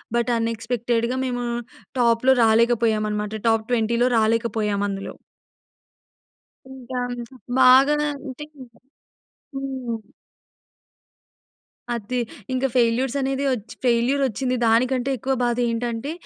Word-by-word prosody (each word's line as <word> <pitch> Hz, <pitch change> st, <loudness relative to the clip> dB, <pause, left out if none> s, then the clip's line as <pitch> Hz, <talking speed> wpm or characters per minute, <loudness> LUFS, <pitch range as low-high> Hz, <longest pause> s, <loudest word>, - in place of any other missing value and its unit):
But 240 Hz, +1 st, +1 dB
అనెక్స్‌పెక్టెడ్‌గా 230 Hz, +2 st, -1 dB
మేము 245 Hz, -1 st, -2 dB, 0.5 s
టాప్‌లో 235 Hz, +2 st, +4 dB
రాలేకపోయామన్నమాట. 220 Hz, -2 st, +1 dB
Top 225 Hz, -1 st, +2 dB
20లో 235 Hz, +1 st, +2 dB
రాలేకపోయామందులో. 210 Hz, -3 st, 0 dB, 1.6 s
ఇంకా 255 Hz, -1 st, -6 dB, 0.6 s
బాగా 260 Hz, +3 st, +6 dB, 0.2 s
అంటే 280 Hz, +1 st, -8 dB, 1.1 s
హ్మ్. 260 Hz, -4 st, -4 dB, 2.0 s
అది 240 Hz, +3 st, -3 dB, 0.3 s
ఇంక 255 Hz, +1 st, -1 dB
ఫెయిల్యూర్స్ 245 Hz, +3 st, +2 dB
అనేది 270 Hz, +1 st, -1 dB
వచ్చి, 230 Hz, -2 st, -5 dB
ఫెయిల్యూరొచ్చింది 255 Hz, +1 st, +1 dB
దానికంటే 250 Hz, +3 st, +2 dB
ఎక్కువ 265 Hz, +4 st, -1 dB
బాదేంటంటే 240 Hz, +2 st, -1 dB
240 Hz, 80 wpm, -23 LUFS, 225-255 Hz, 2.0 s, బాగా